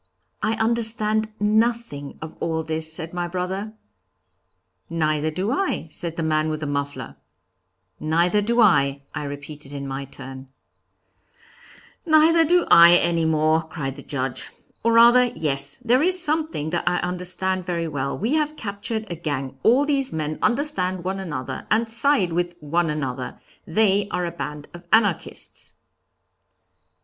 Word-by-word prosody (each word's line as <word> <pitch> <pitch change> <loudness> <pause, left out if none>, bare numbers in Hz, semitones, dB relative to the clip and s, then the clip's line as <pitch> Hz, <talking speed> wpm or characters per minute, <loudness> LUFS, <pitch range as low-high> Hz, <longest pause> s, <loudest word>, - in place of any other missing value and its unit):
'I 220 +1 +1
understand 220 -1 0
nothing 215 -8 0
of 160 - -8
all 160 -1 -1
this,' 160 0 0
said 160 +1 -2
my 175 -1 -2
brother; 190 +4 -4 1.2
'Neither 155 -2 0
do 185 +8 -2
I,' 315 - -1
said 165 0 -2
the 165 - -2
man 155 0 +1
with 155 0 -3
the - - -2
muffler; 140 -3 -4 0.8
'Neither 170 +6 +2
do 235 +4 0
I,' 140 -9 +3
I - - -4
repeated 145 0 -8
in 140 -1 -5
my 135 +1 -4
turn; 135 0 -10 1.6
'Neither 325 0 +5
do 350 +2 +3
I 170 +1 +9
any 170 -2 +1
more,' 155 0 +2
cried 155 -4 -5
the 140 - -9
Judge; 135 -2 -4 0.3
'Or 230 0 +2
rather, 240 +2 +7
yes, 140 -3 0
there 250 +1 +2
is 365 +3 +4
something 310 - -1
that 175 0 0
I 180 - 0
understand 180 +1 -2
very 170 -2 -1
well; 140 -3 -3
we 225 +8 -1
have 305 -1 0
captured 215 +1 -4
a - - -2
gang, 145 -5 -4
all 255 +5 +4
these 275 -3 0
men 155 -1 -3
understand 220 - 0
one 190 +2 -2
another, 140 -8 -5
and 225 +2 +2
side 225 - +2
with 175 0 -1
one 165 +2 0
another; 135 -4 -4 0.3
they 200 +2 +2
are 180 0 -1
a 170 - -3
band 150 -2 -6
of 175 0 -12
Anarchists!' 205 -6 0
175 Hz, 150 wpm, -23 LUFS, 155-220 Hz, 1.6 s, I